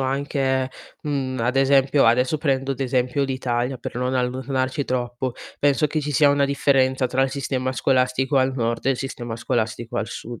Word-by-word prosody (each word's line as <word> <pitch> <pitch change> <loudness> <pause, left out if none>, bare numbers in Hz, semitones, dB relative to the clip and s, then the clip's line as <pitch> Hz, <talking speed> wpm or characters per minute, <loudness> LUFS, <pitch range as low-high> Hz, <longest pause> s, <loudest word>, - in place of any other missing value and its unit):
anche, 135 -1 0 0.3
mhmm, 135 -3 -2
ad 125 +3 0
esempio 135 0 +4
adesso 125 +6 +3
prendo 135 -2 0
ad 135 - -9
esempio 125 +1 0
l'Italia 130 -1 -1
per 120 - -7
non 125 +1 -1
allontanarci 130 +2 -1
troppo, 125 0 -2 0.3
penso 145 +1 +3
che 155 +1 -2
ci 150 0 -3
sia 145 +1 +5
una 140 0 +2
differenza 135 -2 +2
tra 130 +2 -1
il 135 - +2
sistema 130 -2 -2
scolastico 130 +1 +1
al 130 0 +1
nord 115 -1 -2
e 135 - +4
il 130 - +1
sistema 120 -3 -5
scolastico 115 +1 -2
al 110 - -1
sud. 120 -1 -8
130 Hz, 180 wpm, -23 LUFS, 125-135 Hz, 0.3 s, sia